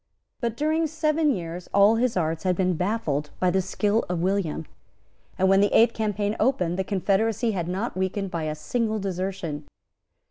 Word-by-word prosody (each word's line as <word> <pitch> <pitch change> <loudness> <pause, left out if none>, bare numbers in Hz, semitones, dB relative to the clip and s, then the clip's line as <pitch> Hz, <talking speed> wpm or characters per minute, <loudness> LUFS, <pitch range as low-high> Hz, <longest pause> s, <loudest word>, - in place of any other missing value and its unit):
But, 235 -3 -2
during 315 +2 +1
seven 310 0 +1
years, 175 -6 -3
all 205 +3 +6
his 240 -3 +1
arts 160 -2 -1
had 185 -1 +1
been 185 0 +1
baffled 160 -6 -1
by 180 -1 +2
the 190 +1 +2
skill 205 +4 0
of 180 -1 -1
William; 185 -5 -1 0.7
and, 190 - +3
when 195 +1 +5
the 205 - +3
eighth 230 +1 +5
campaign 210 -1 -1
opened, 185 -8 +1
the - - +1
confederacy 205 +4 +1
had 175 -5 -3
not 195 +7 -2
been - - -6
weakened 190 +1 -2
by 165 -3 -2
a 155 0 -2
single 220 +7 -1
desertion. 185 -6 -4
195 Hz, 180 wpm, -25 LUFS, 180-225 Hz, 0.7 s, all